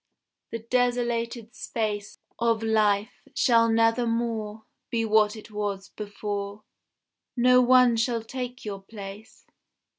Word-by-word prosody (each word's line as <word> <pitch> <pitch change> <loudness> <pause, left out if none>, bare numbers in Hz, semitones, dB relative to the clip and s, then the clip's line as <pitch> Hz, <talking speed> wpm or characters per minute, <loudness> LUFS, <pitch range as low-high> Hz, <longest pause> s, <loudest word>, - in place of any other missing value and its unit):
The 230 - -3
desolated 235 -1 -1
space 210 -3 -3 0.2
Of 230 -1 +1
life 215 -2 +2 0.2
shall 230 -2 +4
nevermore 225 -1 0 0.2
Be 230 -2 0
what 215 0 +3
it 215 0 -11
was 205 -2 -3
before. 205 0 -5 0.7
No 250 +1 +6
one 250 -1 +5
shall 230 0 0
take 250 +1 -6
your 200 -2 -5
place. 200 +1 -10
225 Hz, 110 wpm, -26 LUFS, 210-235 Hz, 0.7 s, No